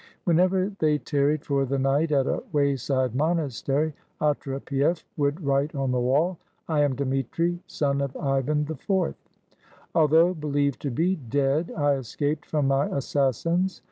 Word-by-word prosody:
Whenever 185 +3 +2
they 155 -1 +3
tarried 145 +3 0
for 140 -1 +1
the 135 +1 -1
night 140 +4 +1
at 135 -3 +3
a - - -1
wayside 135 -4 +1
monastery, 150 0 0 0.3
Otrepief 140 +2 0
would 145 +2 0
write 140 +2 +1
on 135 -2 0
the 125 - +1
wall, 150 +8 +1 0.3
"I 155 -3 +1
am 145 -3 +2
Dmitri, 140 +6 -1
son 140 -1 0
of 140 -1 -3
Ivan 140 +2 0
IV. 170 +4 -1 0.8
Although 160 +3 +4
believed 145 -4 -1
to 140 - -2
be 170 +9 +1
dead, 140 +4 0
I 145 -1 +3
escaped 145 +4 -3
from 150 -3 0
my 135 +1 +2
assassins. 150 +7 0
145 Hz, 140 wpm, -25 LUFS, 135-160 Hz, 0.8 s, Although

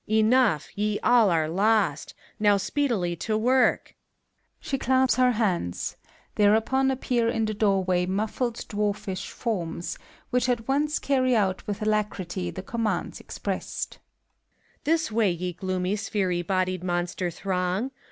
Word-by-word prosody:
Enough 220 - +3
I - - -19
ye 210 0 0
all 235 -4 +5
are 160 -3 +2
lost: 195 -3 +1 0.2
now 205 -1 +4
speedily 200 -5 0
to 215 +5 -1
work! 255 +4 +2 0.6
(She 270 - -3
claps 260 0 +3
her 250 -1 +4
hands; 185 - -1 0.4
thereupon 225 +6 +3
appear 245 -3 0
in 225 -1 0
the 215 - -2
door 200 -2 +2
way 180 -1 +1
muffl'^d 220 +5 -2
dwarfish 205 -2 -2
forms, 175 -7 -3 0.3
which 250 0 +1
at 235 -2 -1
once 295 +3 +1
carry 255 -3 +2
out 190 -4 0
with 210 0 -3
alacrity 200 -4 -1
the 185 - -7
commands 225 +1 -2
expressed,) - - -5 0.9
This 320 -5 +1
way, 215 -2 +3
ye 180 +1 -3
gloomy, 185 +1 -2
sphery 200 -4 -1
bodied 185 0 -1
monster 175 0 -1
throng! 185 +6 -2
210 Hz, 135 wpm, -26 LUFS, 185-235 Hz, 0.9 s, all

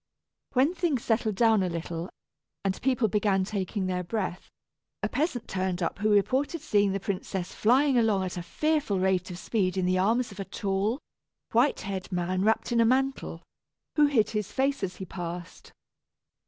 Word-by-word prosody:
When 270 +6 +3
things 335 -9 0
settled 220 -2 +1
down 225 -1 +4
a 185 - 0
little, 170 0 -4 0.6
and 190 -1 -1
people 255 -3 +2
began 200 -2 +2
taking 195 0 -2
their 180 -1 -1
breath, 185 -1 -3 0.5
a - - +2
peasant 285 -5 -1
turned 185 -1 -1
up 165 - -2
who 215 +1 +1
reported 265 - +2
seeing 205 -9 +2
the 195 - -1
princess 190 -1 -3
flying 260 +3 +4
along 215 -4 +2
at 185 - -4
a 175 - -3
fearful 295 - 0
rate 185 -1 +1
of 180 - -6
speed 190 -2 -1
in 185 - +1
the 185 0 +2
arms 225 +5 +2
of 200 - -11
a 195 - -3
tall, 195 +4 -1 0.5
white 245 +5 +3
haired 195 0 -5
man 180 +1 -1
wrapped 220 +3 +1
in 235 -1 +4
a - - +6
mantle, 265 +3 0 0.5
who 300 -2 +6
hid 225 -7 +2
his 210 -2 -2
face 275 +1 0
as 185 -2 -3
he 190 - -7
passed. 175 0 -7
205 Hz, 180 wpm, -28 LUFS, 185-245 Hz, 0.6 s, a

